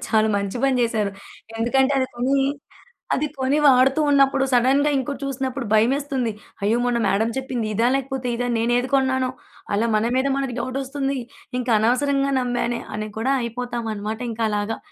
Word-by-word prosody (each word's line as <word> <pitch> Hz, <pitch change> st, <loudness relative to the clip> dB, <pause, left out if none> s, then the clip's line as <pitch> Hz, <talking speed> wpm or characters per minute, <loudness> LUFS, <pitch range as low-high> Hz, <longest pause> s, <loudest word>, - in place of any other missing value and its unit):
చాలా 220 Hz, 0 st, +3 dB
మంచి 200 Hz, +3 st, -2 dB
పని 265 Hz, -2 st, +3 dB
చేసారు. 220 Hz, -3 st, 0 dB, 0.5 s
ఎందుకంటే, 265 Hz, +4 st, +2 dB
అది 260 Hz, -, +1 dB
కొని, 255 Hz, +3 st, +1 dB, 0.8 s
అది 300 Hz, -, 0 dB
కొని 265 Hz, +3 st, +1 dB
వాడుతున్నప్పుడు 275 Hz, +1 st, +4 dB
సడెన్‌గా 270 Hz, +4 st, +3 dB
ఇంకోటి 270 Hz, +1 st, -3 dB
చూసినప్పుడు 265 Hz, -2 st, -3 dB
భయమేస్తుంది. 255 Hz, +1 st, +1 dB, 0.3 s
అయ్యో! 215 Hz, +3 st, +2 dB
మొన్న 245 Hz, -1 st, +1 dB
మేడమ్ 220 Hz, +4 st, +1 dB
చెప్పింది 250 Hz, -4 st, -3 dB
ఇదా? 230 Hz, +3 st, +2 dB
లేకపోతే 265 Hz, -2 st, -3 dB
ఇదా? 245 Hz, +1 st, -1 dB
నేను 235 Hz, +2 st, +1 dB
ఏది 255 Hz, +1 st, -2 dB
కొన్నానో! 260 Hz, -1 st, +2 dB, 0.4 s
అలా 220 Hz, +3 st, +2 dB
మన 215 Hz, +2 st, +1 dB
మీద 260 Hz, +1 st, +2 dB
మనకు 270 Hz, -3 st, -2 dB
డౌటొస్తుంది. 270 Hz, +2 st, -2 dB, 0.4 s
ఇంకా 245 Hz, -1 st, -2 dB
అనవసరంగా 275 Hz, +4 st, +1 dB
నమ్మానే 245 Hz, -1 st, -1 dB
అని 215 Hz, 0 st, -3 dB
కూడా 260 Hz, +5 st, +1 dB
అయిపోతామన్నమాట 230 Hz, -2 st, -4 dB
ఇంకా 225 Hz, 0 st, -2 dB
అలాగా. 210 Hz, +1 st, -1 dB
250 Hz, 150 wpm, -22 LUFS, 230-270 Hz, 0.8 s, వాడుతున్నప్పుడు